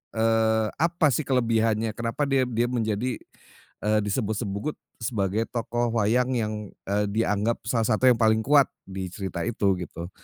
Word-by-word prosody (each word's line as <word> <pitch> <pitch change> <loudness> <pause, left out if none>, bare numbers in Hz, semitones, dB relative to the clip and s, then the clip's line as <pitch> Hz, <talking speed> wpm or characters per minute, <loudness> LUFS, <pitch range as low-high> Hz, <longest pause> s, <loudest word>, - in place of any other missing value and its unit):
eee, 110 0 +2
apa 165 0 +2
sih 150 +3 0
kelebihannya, 115 -3 +1
kenapa 115 +5 -2
dia 135 -2 +3
dia 120 0 0
menjadi, 115 0 -1 0.7
eee, 105 0 +3
disebut-sebut 105 +4 -2 0.2
sebagai 110 -1 -1
tokoh 120 0 -1
wayang 120 +5 +2
yang, 110 -1 -1 0.4
eee, 105 +1 +1
dianggap 110 +1 0
salah 115 -2 +1
satu 125 +4 +4
yang 120 - +4
paling 110 -1 +4
kuat 140 -1 +6 0.2
di 95 -1 -5
cerita 95 -2 -4
itu 100 -5 +1
gitu. 85 0 -7
115 Hz, 145 wpm, -26 LUFS, 105-120 Hz, 0.7 s, kuat